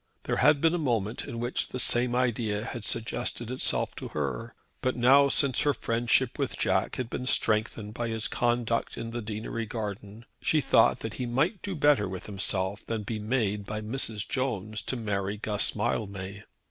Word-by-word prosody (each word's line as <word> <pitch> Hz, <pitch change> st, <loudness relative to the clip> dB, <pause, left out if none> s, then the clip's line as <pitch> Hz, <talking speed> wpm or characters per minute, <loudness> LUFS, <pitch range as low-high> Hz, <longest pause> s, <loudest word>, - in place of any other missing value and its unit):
There -, -, -1 dB
had 145 Hz, +1 st, +5 dB
been 165 Hz, 0 st, +4 dB
a 175 Hz, -, 0 dB
moment 115 Hz, -7 st, -1 dB
in 115 Hz, -, -6 dB
which 120 Hz, +2 st, -1 dB
the -, -, -6 dB
same 120 Hz, 0 st, +4 dB
idea 115 Hz, -4 st, 0 dB
had 120 Hz, -4 st, -5 dB
suggested 120 Hz, +1 st, -2 dB
itself 130 Hz, -, +1 dB
to -, -, -5 dB
her; 70 Hz, -5 st, -4 dB, 0.3 s
but 130 Hz, -, 0 dB
now 135 Hz, +3 st, +6 dB
since 135 Hz, -2 st, +3 dB
her 145 Hz, -2 st, +2 dB
friendship 120 Hz, +2 st, +1 dB
with -, -, -1 dB
Jack -, -, +1 dB
had 125 Hz, -, -3 dB
been 125 Hz, +2 st, -4 dB
strengthened 110 Hz, -2 st, +1 dB
by 120 Hz, 0 st, -2 dB
his 115 Hz, -1 st, 0 dB
conduct 120 Hz, -1 st, 0 dB
in 115 Hz, 0 st, -5 dB
the 120 Hz, 0 st, -3 dB
deanery 110 Hz, +1 st, -4 dB
garden 105 Hz, 0 st, -6 dB, 0.2 s
she 155 Hz, -, +3 dB
thought 115 Hz, -5 st, +4 dB
that 110 Hz, -, -4 dB
he 125 Hz, -, -1 dB
might 150 Hz, -, +1 dB
do 195 Hz, -2 st, -4 dB
better 145 Hz, -, +3 dB
with 95 Hz, -1 st, -6 dB
himself 100 Hz, 0 st, -1 dB
than 110 Hz, -2 st, -2 dB
be 110 Hz, +1 st, -4 dB
made 105 Hz, -2 st, 0 dB
by 105 Hz, 0 st, -3 dB
Mrs. 110 Hz, -1 st, -1 dB
Jones 110 Hz, -5 st, -2 dB
to -, -, -2 dB
marry 100 Hz, -3 st, -2 dB
Guss 105 Hz, -1 st, 0 dB
Mildmay. 100 Hz, -1 st, -3 dB
115 Hz, 185 wpm, -28 LUFS, 105-125 Hz, 0.3 s, now